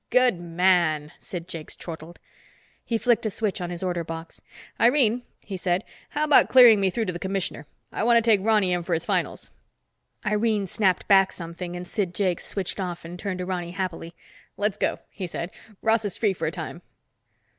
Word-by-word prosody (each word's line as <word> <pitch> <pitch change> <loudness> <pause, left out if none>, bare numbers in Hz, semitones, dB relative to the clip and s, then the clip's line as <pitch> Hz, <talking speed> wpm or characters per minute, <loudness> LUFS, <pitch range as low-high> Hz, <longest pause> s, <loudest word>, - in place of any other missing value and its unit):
"Good 250 -8 +3
man!" 170 -3 +2
Sid 175 -2 -7
Jakes 165 -4 -7
chortled. 165 0 -9 0.7
He 230 - -1
flicked 235 -1 +2
a - - 0
switch 205 -1 -2
on 175 - -3
his 175 +1 -5
order 175 -2 -1
box. 165 0 -8 0.4
"Irene," 245 -1 +4 0.2
he 195 -2 -5
said, 180 +2 0 0.3
"how 300 - -1
about 300 -1 +6
clearing 240 -5 +8
me 195 - +3
through 225 +4 -1
to 180 - -3
the 175 - -5
commissioner? 190 0 -3 0.2
I - - -2
want 235 0 +5
to 230 0 +2
take 210 -4 +4
Ronny 210 -4 +3
in 175 - 0
for 170 0 -1
his 165 - -3
finals." - - -2 0.7
Irene 210 0 +1
snapped 190 -1 +1
back 195 -1 +5
something 175 +1 -7
and 180 0 -6
Sid 185 -4 -2
Jakes 185 -4 -1
switched 195 0 -4
off 175 -3 -4
and 175 +2 -8
turned 200 -2 -3
to 180 - -4
Ronny 175 -2 -3
happily. 175 -3 -4 0.4
"Let's 210 0 0
go," - - 0
he 190 -3 -5
said. 170 +1 -5 0.3
"Ross 225 0 +3
is 205 -3 -2
free 210 -4 +2
for - - -3
a - - -1
time." - - -6
185 Hz, 195 wpm, -25 LUFS, 175-215 Hz, 0.7 s, clearing